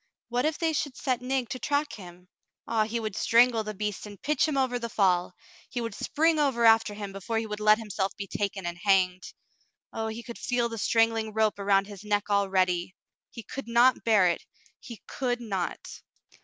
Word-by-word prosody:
What 245 +2 0
if 310 0 0
they 325 -1 0
should 285 -3 -2
set 255 -3 -1
Nig 255 -1 -1
to 255 - -4
track 290 +1 -1
him! 180 -2 -12 0.4
Ah, 225 -2 +1
he 230 +2 -3
would 215 -3 -4
strangle 235 -1 +4
the 215 0 -6
beast 210 +1 -4
and 205 -2 -11
pitch 300 +1 +1
him 300 -3 -1
over 255 -2 +1
the 235 -1 -4
fall. 180 -4 +1 0.3
He 245 - -4
would 230 -2 -4
spring 320 +8 +1
over 265 -5 +2
after 225 -2 +5
him 205 -1 -6
before 195 +4 -4
he 225 - -1
would 210 -1 -5
let 215 0 +5
himself 205 -3 -2
be 200 - -4
taken 200 -1 -3
and 175 0 -4
hanged. 185 -2 +2 0.6
Oh, 220 0 -3
he 220 +2 -6
could 235 -1 -9
feel 245 -2 0
the 230 -1 -6
strangling 225 0 +1
rope 215 -1 +1
around 195 0 +3
his 200 -1 -11
neck 210 0 -1
already! 185 -3 +1 0.3
He 230 - -10
could 275 +2 -7
not 240 +2 +4
bear 210 -5 +4
it 170 - -1 0.2
— - - -32
he 235 -5 -10
could 245 -2 -2
not 195 -7 -3
220 Hz, 205 wpm, -27 LUFS, 200-245 Hz, 0.6 s, after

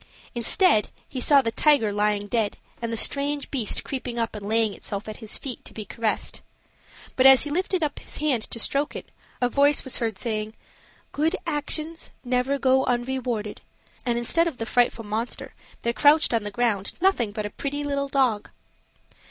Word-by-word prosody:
Instead, 235 - +3 0.2
he 260 - -5
saw 280 +1 +5
the 230 - 0
tiger 230 -4 +3
lying 205 0 +1
dead, 215 -1 -1 0.2
and 230 -1 -3
the 230 - -1
strange 285 +4 +1
beast 240 -7 0
creeping 250 -3 -5
up 230 -1 -1
and 205 -1 -6
laying 220 -1 +2
itself 200 +1 -6
at 215 - -6
his 220 -3 -4
feet 260 -4 -4
to - - -11
be 215 - -6
caressed. 220 +2 -2 0.7
But 260 0 +6
as 265 -1 +8
he 295 - -5
lifted 365 +1 0
up 300 - -2
his - - -8
hand 290 -6 +1
to - - -5
stroke 280 +6 -1
it, - - -8 0.3
a 245 - +4
voice 285 +3 +3
was 265 - -1
heard 225 -4 -2
saying, 215 0 -3 0.6
"Good 315 +6 +1
actions 315 +1 -2
never 255 +2 0
go 265 -1 +3
unrewarded;" 240 -3 -2 0.4
and 240 -1 0
instead 330 +8 +2
of 310 -7 -4
the 225 - -3
frightful 235 -1 +1
monster, 220 +3 -4 0.3
there 235 - 0
crouched 295 +2 +4
on 230 - +2
the 205 - -4
ground 205 -3 0
nothing 345 - +2
but 210 0 -4
a 210 - -5
pretty 285 +5 -4
little 280 -1 -2
dog. 255 -7 +1
245 Hz, 185 wpm, -25 LUFS, 220-280 Hz, 0.7 s, as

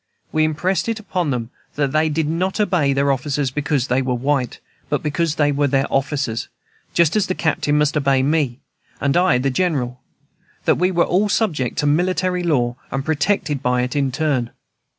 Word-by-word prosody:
We 155 - +2
impressed 180 +7 0
it 225 -1 -2
upon 185 -6 -2
them 120 -3 -3 0.2
that 140 -2 0
they 155 +2 +2
did 155 0 0
not 180 +6 -1
obey 175 -9 +2
their 140 +1 +2
officers 135 0 -1
because 140 -2 0
they 130 +1 +1
were 130 -1 -1
white, 130 0 -1 0.3
but - - -1
because 155 +1 0
they 145 -2 +2
were 145 0 +1
their 135 0 +2
officers, 135 -4 -1 0.5
just 170 0 +3
as 210 -3 +2
the 185 - -1
Captain 150 -2 0
must 150 +1 +2
obey 135 -3 +2
me, 140 -4 0 0.4
and 140 +1 +1
I 175 -7 +4
the 135 +2 0
General; 125 -6 -1 0.6
that - - +3
we 180 +1 +3
were 175 -2 +2
all 200 +4 +1
subject 155 - 0
to - - 0
military 180 +4 +1
law, 125 -8 0
and 135 0 -3
protected 150 -2 0
by 125 -1 +1
it 125 +2 -3
in 140 -2 +1
turn. 135 -4 0
145 Hz, 190 wpm, -20 LUFS, 135-170 Hz, 0.6 s, I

